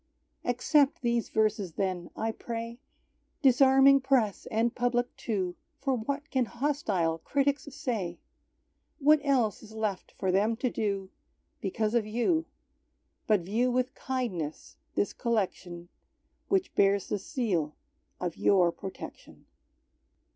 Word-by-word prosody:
Accept 270 +3 +2
these 235 -1 +1
verses 215 -5 +1
then, 185 -2 -2
I 225 0 -1
pray, 230 +1 -6 0.6
Disarming 270 +1 +6
press 255 -7 +1
and 225 +2 +1
public 245 0 0
too, 185 -6 -2 0.2
For 275 -2 0
what 280 +6 -4
can 260 -3 +2
hostile 215 - 0
critics 280 - 0
say? 230 - -3 0.8
What 305 +2 +5
else 255 -7 +2
is 220 -1 -13
left 210 -4 -2
for 190 - -1
them 210 +5 +2
to 245 +1 -1
do, 200 -3 -2 0.5
Because 215 +2 -1
of 230 -3 +2
You, 315 +10 +1 0.8
But 210 -4 +4
view 220 +8 +1
with 255 +1 0
kindness 215 - -4 0.2
this 205 - 0
collection, 185 -7 -2 0.6
Which 385 -1 +1
bears 200 -1 +3
the 210 - -1
seal 190 - -1 0.4
of 175 -2 -3
Your 180 -3 +4
protection? 185 +3 -9
225 Hz, 120 wpm, -29 LUFS, 195-260 Hz, 0.8 s, Disarming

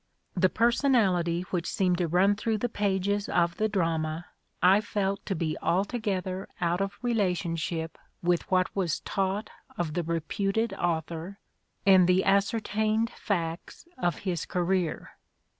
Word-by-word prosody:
The 185 0 +3
personality 210 -9 +2
which 175 -2 -1
seemed 180 -2 +1
to 175 - +1
run 185 +5 +3
through 220 +1 -1
the 245 - -1
pages 200 -1 0
of 170 -1 +1
the 215 0 +1
drama 165 -3 -1 0.3
I 190 +3 +5
felt 200 -3 -2
to 195 - -1
be 160 -2 -1
altogether 190 -1 -1
out 175 +1 0
of 195 +1 -3
relationship 175 -7 -1 0.2
with 175 0 +1
what 185 -1 +1
was 180 -5 0
taught 195 +2 -2 0.3
of 170 -3 -2
the 175 - 0
reputed 195 +6 -1
author 170 +1 -3 0.5
and 190 -3 +7
the 185 +1 +4
ascertained 215 +3 +1
facts 170 - -4
of 175 -10 0
his 175 -4 -2
career. 180 -2 -1
185 Hz, 135 wpm, -28 LUFS, 170-205 Hz, 0.5 s, and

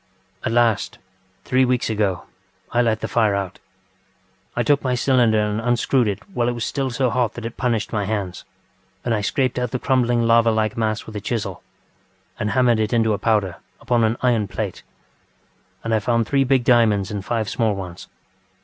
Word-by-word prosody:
ŌĆ£At - - -1
last, 115 -3 +1 0.5
three 130 +1 +3
weeks 125 -1 +1
ago, 105 -5 0 0.5
I 120 - +3
let 110 -2 +1
the - - -2
fire 110 -4 +2
out. 100 -1 -4 1.0
I - - +1
took 145 -1 +3
my 130 -2 +1
cylinder 120 -4 +3
and 105 +1 -1
unscrewed 120 +1 +2
it 100 - -4
while 120 -6 0
it - - -1
was 120 -1 -3
still 135 -2 -2
so 125 0 0
hot 120 -2 0
that 120 - -7
it 115 - -5
punished 115 -3 -1
my 105 -2 0
hands, 100 -4 -3 0.6
and 120 - +1
I 105 - 0
scraped 130 +3 0
out 125 -1 -1
the 125 - -2
crumbling 120 -2 +1
lava 115 0 +4
like 110 -1 0
mass 110 -1 -1
with 110 - -10
a - - -5
chisel, 115 +1 -3 0.8
and 105 - -1
hammered 120 -2 +3
it 110 +2 0
into 110 -2 +3
a 100 - -2
powder 105 -6 +1 0.2
upon 120 -1 +1
an 110 +2 +1
iron 115 -5 +2
plate. - - -4 1.0
And 115 - -1
I 110 - +3
found 115 +1 +1
three 135 +2 +2
big 130 -1 +2
diamonds 110 -5 +3
and 100 -2 -4
five 110 0 -1
small 110 -1 0
ones. 90 -3 -8
115 Hz, 195 wpm, -21 LUFS, 105-125 Hz, 1.0 s, lava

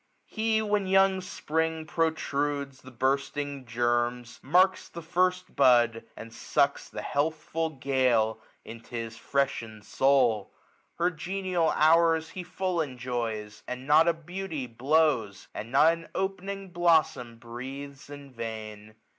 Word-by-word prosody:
He, 220 0 0
when 205 -2 0
young 190 0 +4
Spring 160 -2 -2
protrudes 145 -4 -1
the 130 - -12
bursting 140 +1 -2
gennes, 120 +1 -1
Marks 185 +6 +3
the 170 - -9
first 180 +2 0
bud, 120 -4 +4
and 115 0 -9
sucks 140 +4 0
the - - -6
healthful 160 +2 -1
gale 130 -6 +1 0.2
13 - - -7
10 - - -10
Into - - -21
his 115 -1 -5
freshened 115 -7 -2
soul; 125 -7 +2 0.4
her 175 +1 +1
genial 180 0 -1
hours 165 0 +4
He 185 - -6
full 180 -1 -2
enjoys; 120 -6 -4
and 125 +1 -5
not 155 +3 +5
a 170 - +4
beauty 165 -3 -5
blows, 125 -3 +1
And 115 +3 -7
not 150 +5 +5
an 165 0 -9
opening 195 0 -3
blossom 160 -9 +2
breathes 135 +4 -8
in 145 -1 -10
vain. 110 -2 -7
140 Hz, 130 wpm, -28 LUFS, 120-170 Hz, 0.4 s, not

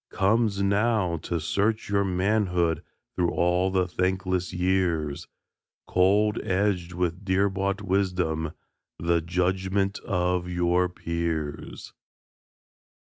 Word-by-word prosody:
Comes 100 0 +1
now, 100 -3 +2
to 85 +2 -3
search 100 +8 0
your 100 0 +2
manhood 90 -4 +1 0.3
Through 90 -2 +1
all 90 +2 +2
the 95 -1 +1
thankless 90 0 -1
years, 90 -5 0 0.6
Cold, 105 +4 +3
edged 90 -2 0
with 90 +1 -2
dear 95 +1 +2
bought 100 +1 -2
wisdom, 90 -5 0 0.4
The 85 0 +1
judgment 95 +3 0
of 90 -1 -1
your 90 0 +1
peers! 85 -4 -4
90 Hz, 100 wpm, -26 LUFS, 85-100 Hz, 0.6 s, Cold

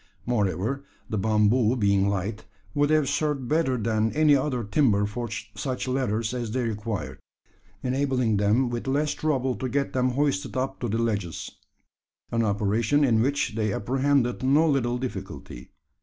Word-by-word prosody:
Moreover, 115 +3 -1 0.3
the 110 - 0
bamboo 110 +3 +3
being 100 -3 +2
light, 100 +2 -3 0.3
would 145 0 +2
have 155 -2 +3
served 145 -3 -1
better 150 -4 +1
than 110 0 0
any 150 -1 +5
other 130 -3 0
timber 105 -2 +2
for 120 +3 -4 0.2
such 130 -2 -3
ladders 120 -3 -1
as 120 -3 -3
they 125 +3 -1
required 110 -2 -4 0.6
enabling 130 -4 +1
them 110 +5 +2
with 120 +2 -4
less 145 +2 +1
trouble 135 -4 0
to 130 - -3
get 140 +2 -1
them 130 0 +2
hoisted 135 -5 0
up 130 +1 -2
to 120 - -2
the 110 +1 -1
ledges 105 -7 -2 0.8
an 115 - +1
operation 110 +7 +1
in 115 -5 +3
which 135 -1 0
they 110 -1 0
apprehended 130 +3 +1
no 145 +5 +4
little 125 -5 +1
difficulty. 95 - -7
120 Hz, 155 wpm, -26 LUFS, 105-135 Hz, 0.8 s, any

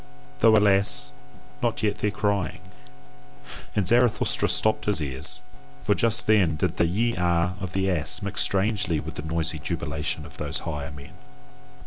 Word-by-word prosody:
Though, 110 -1 +6
alas! 95 -10 +3 0.5
not 120 -1 -1
yet 105 -1 0
their 105 - +1
crying." 100 -4 -1 1.2
And 105 - +1
Zarathustra 120 +2 +2
stopped 110 0 +1
his 105 -4 0
ears, 70 +5 -3 0.4
for 105 - +2
just 115 0 +2
then 100 -7 +3
did 85 +2 -2
the 85 - +3
YE 115 +7 0
A 85 0 +1
of 95 -2 -6
the 95 0 0
ass 80 -3 +3
mix 100 0 -2
strangely 100 -4 +1
with 80 +1 -7
the 75 - -6
noisy 80 0 -1
jubilation 75 -2 -3
of - - -13
those - - -2
higher 75 -3 -5
men. 70 -1 -12
90 Hz, 155 wpm, -25 LUFS, 80-105 Hz, 1.2 s, Though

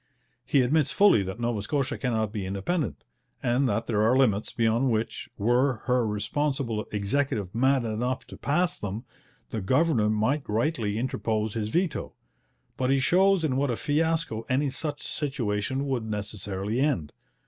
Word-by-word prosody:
He 140 - +4
admits 150 +3 +2
fully 200 - +5
that 95 +3 -5
Nova 120 -3 -1
Scotia 140 +5 -1
cannot 110 -5 -1
be 105 -3 -3
independent, 100 - -2 0.4
and 125 +1 +2
that 115 -1 0
there 105 -3 +1
are 115 +4 +4
limits 110 -6 +2
beyond 115 +3 +2
which, 110 -1 -2
were 120 +3 +2
her 125 -1 +2
responsible 115 +2 -1
Executive 105 -1 -1
mad 130 +2 +2
enough 120 +4 -2
to - - -11
pass 170 +5 0
them, 105 +4 -5 0.5
the 110 - -2
governor 130 - +2
might 110 +7 0
rightly 110 -2 0
interpose 110 -3 -1
his 110 -2 -2
veto. 175 +5 -1 0.6
But 130 0 0
he 135 0 +3
shows 190 +5 +4
in 135 -5 +1
what 140 0 +1
a 120 - -1
fiasco 160 -6 0
any 135 +2 +1
such 145 +1 -3
situation 130 -2 -2
would 130 -5 -1
necessarily 105 0 -3
end. 100 - 0
120 Hz, 155 wpm, -27 LUFS, 105-140 Hz, 0.6 s, fully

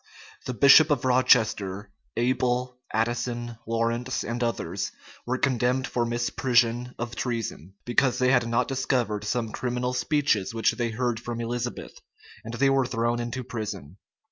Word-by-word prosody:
The 125 - -3
bishop 140 +4 +7
of 140 -4 +1
Rochester, 105 -5 +2 0.3
Abel, 125 +1 0
Addison, 120 +1 -2
Lawrence, 115 +2 -1
and 120 +1 -3
others 95 -5 -2 0.4
were 130 +1 0
condemned 130 0 +1
for 120 -2 -1
misprision 120 0 +1
of 120 -1 -5
treason; 110 - -4
because 120 +1 +2
they 130 0 +3
had 125 -3 +3
not 115 +1 +1
discovered 125 -6 -1
some 115 +1 -2
criminal 125 +1 -2
speeches 125 - +1
which 115 - +3
they 120 0 -2
heard 120 0 -1
from 120 -1 -5
Elizabeth;[] 120 +1 -4 0.4
and 115 +1 -6
they 135 +3 +3
were 135 -2 +2
thrown 120 0 0
into 120 +2 -4
prison. 105 - -6
120 Hz, 145 wpm, -26 LUFS, 115-125 Hz, 0.4 s, bishop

